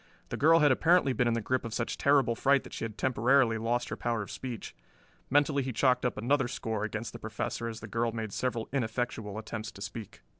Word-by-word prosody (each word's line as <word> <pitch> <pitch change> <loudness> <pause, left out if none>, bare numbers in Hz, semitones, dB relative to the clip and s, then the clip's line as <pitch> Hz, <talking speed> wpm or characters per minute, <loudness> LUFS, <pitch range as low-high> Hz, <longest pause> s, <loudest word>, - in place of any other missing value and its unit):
The - - -3
girl 165 +2 +5
had 145 -2 +5
apparently 165 0 +4
been 125 -1 +1
in 115 - +2
the 115 - -1
grip 130 +4 0
of 115 -1 -5
such 120 - -2
terrible 140 -4 +3
fright 140 +3 +3
that - - -12
she - - -5
had 110 -2 -5
temporarily 125 -1 +3
lost 120 +2 -1
her - - -3
power 115 -2 -1
of - - -9
speech. 125 -4 -6 0.6
Mentally 145 0 +3
he 130 0 -3
chalked 125 +1 +2
up 125 - -5
another 130 +3 +1
score 110 -3 -3
against 110 +1 -4
the - - -8
Professor 110 +1 -4
as 115 -1 -6
the 105 - -7
girl 115 +2 0
made 110 -3 -5
several 120 -3 -2
ineffectual 115 -4 -2
attempts 110 0 -5
to 100 - -12
speak. 105 +1 -8
120 Hz, 225 wpm, -30 LUFS, 110-130 Hz, 0.6 s, girl